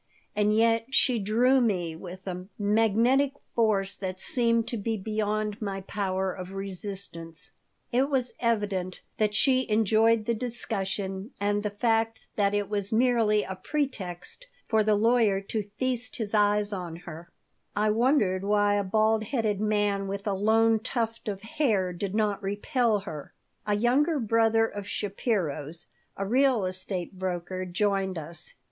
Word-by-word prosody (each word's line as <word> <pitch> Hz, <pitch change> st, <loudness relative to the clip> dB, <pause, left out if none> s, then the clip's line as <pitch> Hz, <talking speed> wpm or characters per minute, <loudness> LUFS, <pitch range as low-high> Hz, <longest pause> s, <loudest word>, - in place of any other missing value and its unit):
And 210 Hz, 0 st, +2 dB
yet 225 Hz, +1 st, +3 dB
she 255 Hz, -3 st, +3 dB
drew 240 Hz, +6 st, +3 dB
me 180 Hz, -8 st, 0 dB
with 185 Hz, +2 st, -9 dB
a 180 Hz, -1 st, -5 dB
magnetic 225 Hz, +6 st, +3 dB, 0.2 s
force 205 Hz, -4 st, +1 dB
that 185 Hz, -1 st, -4 dB
seemed 230 Hz, -1 st, +1 dB
to 235 Hz, -, -2 dB
be 220 Hz, +2 st, -2 dB
beyond 215 Hz, +1 st, -2 dB
my 195 Hz, -2 st, -3 dB
power 190 Hz, -1 st, -2 dB
of 185 Hz, +1 st, -8 dB
resistance 195 Hz, -4 st, -4 dB, 0.4 s
It 260 Hz, +3 st, +2 dB
was 260 Hz, -3 st, 0 dB
evident 205 Hz, -6 st, -1 dB, 0.2 s
that 210 Hz, -1 st, +1 dB
she 260 Hz, +2 st, +3 dB
enjoyed 220 Hz, +1 st, +3 dB
the 235 Hz, -, +1 dB
discussion 205 Hz, -3 st, -2 dB
and 205 Hz, +1 st, +1 dB
the 210 Hz, -, -1 dB
fact 225 Hz, +1 st, 0 dB
that 200 Hz, -1 st, +2 dB
it 205 Hz, -1 st, 0 dB
was 205 Hz, -2 st, -2 dB
merely 225 Hz, -3 st, +3 dB
a 190 Hz, -, -5 dB
pretext 210 Hz, -, -4 dB, 0.2 s
for 220 Hz, -1 st, +3 dB
the 215 Hz, 0 st, +3 dB
lawyer 220 Hz, -2 st, +3 dB
to 205 Hz, +1 st, -4 dB
feast 250 Hz, -1 st, -1 dB
his 220 Hz, -3 st, -2 dB
eyes 205 Hz, 0 st, +3 dB
on 175 Hz, -4 st, -5 dB
her 170 Hz, 0 st, -10 dB, 0.5 s
I 210 Hz, +1 st, +2 dB
wondered 215 Hz, -5 st, +2 dB
why 205 Hz, 0 st, +3 dB
a 205 Hz, -, +1 dB
bald 215 Hz, +2 st, +2 dB
headed 215 Hz, -4 st, 0 dB
man 205 Hz, -2 st, +1 dB
with 200 Hz, 0 st, -4 dB
a 205 Hz, -, 0 dB
lone 220 Hz, +3 st, +3 dB
tuft 230 Hz, -1 st, -3 dB
of 200 Hz, -2 st, -3 dB
hair 220 Hz, -7 st, 0 dB
did 195 Hz, +3 st, -4 dB
not 210 Hz, -2 st, +1 dB
repel 210 Hz, +2 st, 0 dB
her 155 Hz, -7 st, -8 dB, 0.3 s
A 210 Hz, -, +2 dB
younger 275 Hz, +8 st, +2 dB
brother 225 Hz, -1 st, +3 dB
of 205 Hz, -2 st, -6 dB
Shapiro's, 180 Hz, -, -2 dB, 0.3 s
a 195 Hz, -, -2 dB
real 250 Hz, -1 st, +3 dB
estate 185 Hz, 0 st, -3 dB
broker, 185 Hz, 0 st, -3 dB
joined 190 Hz, 0 st, 0 dB
us. 165 Hz, +2 st, -4 dB
210 Hz, 150 wpm, -27 LUFS, 195-225 Hz, 0.5 s, yet